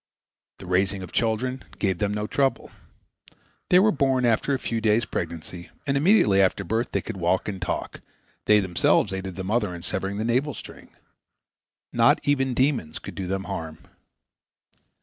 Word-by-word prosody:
The - - -11
raising 95 +1 0
of 90 - -9
children 125 +3 -1
gave 95 -4 0
them 105 -1 0
no 105 0 -2
trouble. 135 0 0 1.0
They 180 - +6
were 210 +4 +5
born 135 -5 +1
after 115 +4 +2
a 135 - +2
few 115 -3 -3
days' 110 +1 +2
pregnancy, 85 +1 -5 0.2
and 140 - 0
immediately 140 - +4
after 95 +1 +2
birth 110 +6 -1
they 100 - 0
could - - -6
walk 90 +1 0
and 95 -3 -4
talk; - - -4 0.4
they 105 0 +6
themselves 95 +1 +2
aided 95 -1 -5
the 95 - -5
mother 105 -2 0
in 85 - -9
severing 95 +2 -3
the 110 - -2
navel 130 +4 0
string. - - -11 1.0
Not - - +4
even 135 -3 +1
demons 130 - 0
could - - -8
do 95 -2 -5
them 95 +1 -2
harm. 80 -3 -5
105 Hz, 170 wpm, -25 LUFS, 95-130 Hz, 1.0 s, They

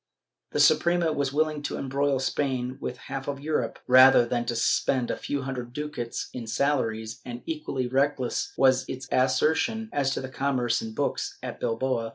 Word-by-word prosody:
^ - - -31
The - - 0
Suprema 170 -2 +4
was 140 -2 -1
willing 155 0 0
to 145 - -4
embroil 140 +1 0
Spain 130 -1 -2
with 125 - -4
half 135 +1 -6
of 140 -1 -3
Europe 150 +2 -2
rather 130 -1 +7
than 120 0 -1
to 120 - -2
spend 120 +1 +1
a - - -1
few 140 -1 -3
hundred 125 -3 -5
ducats 145 -5 -4
in 120 -3 -6
salaries, 115 -2 -1
and 120 -1 -7
equally 150 -5 -3
reckless 135 -1 0
was 130 -1 +4
its 130 0 -6
assertion 160 - +1
as 140 -2 +1
to - - -2
the 130 - -5
commerce 130 -3 0
in 110 -1 -7
books - - -2
at - - -6
Bilbao. 115 0 -1
130 Hz, 180 wpm, -26 LUFS, 125-145 Hz, -, rather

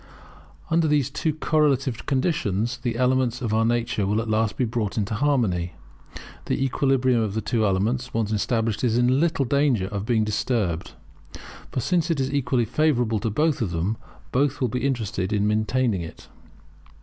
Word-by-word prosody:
Under 165 -1 +3
these 145 -3 +1
two 155 +2 -1
correlative 145 -5 0
conditions 125 - 0
the 120 -2 -2
elements 125 0 +1
of 115 -4 -2
our 110 +1 +3
nature 115 -3 0
will 105 +2 +1
at 115 - -3
last 110 -1 0
be 125 - +1
brought 110 -3 -2
into 105 0 -1
harmony. 105 - 0 0.7
The - - 0
equilibrium 130 -2 +2
of 105 -2 -2
these 110 - -2
two 110 -1 +1
elements, 115 +7 0
once 110 -2 -1
established, 110 +2 0
is 120 -2 +2
in 125 +2 +3
little 160 -4 +1
danger 135 -6 +2
of 105 0 -4
being 115 -3 +2
disturbed. 105 -5 -1 0.8
For 130 - -2
since 175 +4 +1
it 165 -4 0
is 135 +1 -1
equally 125 -3 +1
favourable 120 -5 +1
to 110 - -1
both 150 +6 +1
of 110 - 0
them, 85 +6 -1 0.4
both 140 +2 +1
will 125 - +1
be 125 +3 -3
interested 105 -7 -2
in 105 -1 +1
maintaining 110 -1 +1
it. 80 - -10
120 Hz, 175 wpm, -24 LUFS, 105-135 Hz, 0.8 s, Under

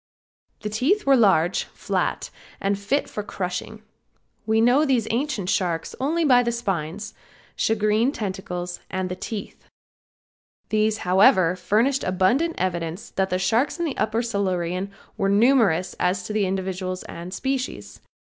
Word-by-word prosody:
The 210 - -3
teeth 270 - +1
were 275 -1 +6
large, 190 -7 +3
flat - - -2 0.3
and 200 0 0
fit 260 +9 0
for 210 - -5
crushing. 200 +2 -5 0.6
We 220 0 +3
know 245 +6 +4
these 255 -7 +1
ancient 235 -6 -1
sharks 170 -3 -1
only 320 +5 +1
by 250 -4 +6
the 235 -1 0
spines, 200 -4 -3 0.4
shagreen 220 +3 +2
tentacles 185 -6 -4
and 185 -1 -2
the 180 - -3
teeth. 205 +1 -7 1.0
These, 215 0 +2
however, 185 -1 +5
furnished 225 +9 +1
abundant 240 - +1
evidence 170 0 -3
that 190 0 0
the 185 - 0
sharks 220 - +1
in 345 - -1
the 295 - -3
upper 225 +2 0
Silurian 190 -3 -1 0.3
were 195 - +1
numerous 205 -5 +3
as 185 +1 +1
to 210 +3 -1
individuals 185 -1 -2
and 170 +2 -8
species. 265 +6 -4
205 Hz, 135 wpm, -24 LUFS, 185-235 Hz, 1.0 s, were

